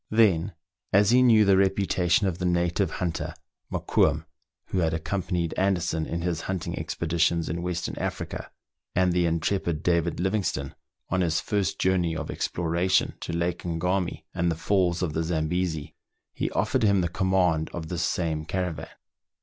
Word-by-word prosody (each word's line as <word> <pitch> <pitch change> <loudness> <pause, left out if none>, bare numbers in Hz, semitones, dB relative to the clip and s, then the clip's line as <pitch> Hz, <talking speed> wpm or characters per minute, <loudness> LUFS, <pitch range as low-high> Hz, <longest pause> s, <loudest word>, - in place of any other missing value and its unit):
Then, 100 -5 +3 0.4
as 100 +2 +5
he 125 +1 +6
knew 115 -4 +6
the 95 -1 +5
reputation 95 -1 +2
of 90 -3 -1
the 90 - -2
native 85 -1 +1
hunter, 85 -2 -3 0.4
Mokoum, - - +1 0.4
who 95 - 0
had 80 -2 +1
accom 80 +5 -2
panied 85 -3 -1
Anderson 85 -4 +1
in 85 0 -3
his 85 -2 -1
hunting 95 -4 -2
expeditions 85 0 0
in 85 +2 -2
Western 90 -1 -3
Africa, - - -4 0.5
and 90 -1 +3
the 90 -1 +2
intrepid 85 -1 -1
David 85 -1 +1
Livingstone 95 -7 -1 0.4
on 95 0 +1
his 80 -2 +1
first 100 -3 -1
journey 90 -3 +1
of 80 -1 -4
exploration 85 +2 0
to - - -5
Lake 85 +1 -1
Ngami 90 0 -1
and 85 -1 +1
the 80 - 0
falls 90 0 +1
of 80 -4 -1
the 80 - 0
Zambesi, 80 -1 -1 0.4
he - - -2
offered - - 0
him 100 -3 +4
the 85 - +1
command 90 -3 +1
of 80 -2 -6
this 90 -2 -2
same 80 -3 -1
caravan. 90 -1 -3
85 Hz, 160 wpm, -26 LUFS, 80-95 Hz, 0.5 s, he